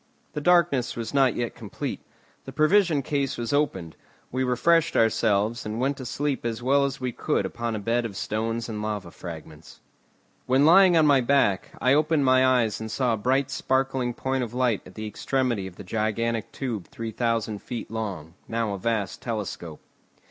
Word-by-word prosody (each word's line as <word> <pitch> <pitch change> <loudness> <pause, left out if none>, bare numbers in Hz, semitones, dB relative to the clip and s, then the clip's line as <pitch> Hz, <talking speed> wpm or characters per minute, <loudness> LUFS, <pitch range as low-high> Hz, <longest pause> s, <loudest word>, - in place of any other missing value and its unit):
The 150 - -3
darkness 155 -7 +3
was 115 +2 -5
not 135 -3 +3
yet 120 -1 -2
complete. 110 -4 -5 0.5
The 135 - -7
provision 155 +1 +3
case 140 -1 -1
was 120 +3 -3
opened; 95 - -1 0.4
we 130 +1 0
refreshed 140 +7 +2
ourselves, 110 0 +2
and 110 +2 -4
went 135 +3 +1
to 130 - -6
sleep 145 +2 -2
as 115 0 -3
well 140 +2 +3
as 135 -1 -3
we 130 -1 -2
could - - -1
upon 115 -1 -3
a - - -3
bed 115 +3 0
of 105 -4 -5
stones 115 +3 -2
and 110 -2 -5
lava 105 -5 -4
fragments. 80 -3 -10 0.7
When 130 +3 +4
lying 180 +1 +7
on 160 - +5
my 140 -3 +5
back, 120 -7 +1
I 130 - +3
opened 150 -1 +2
my 130 0 +5
eyes 125 -5 +2
and 110 - -5
saw 125 0 0
a - - -1
bright 130 +5 +1
sparkling 130 -2 0
point 130 0 -1
of 120 0 -6
light 125 -5 +1
at 90 - -15
the 110 - -5
extremity 120 -1 -1
of 90 - -11
the - - -10
gigantic 110 +3 -1
tube 115 -9 -4
3,000 115 -2 -2
feet 120 -3 -6
long, 95 -8 -5
now 115 -2 -1
a 100 - -5
vast 105 -2 -2
telescope. 105 -8 -5
120 Hz, 185 wpm, -25 LUFS, 110-135 Hz, 0.7 s, lying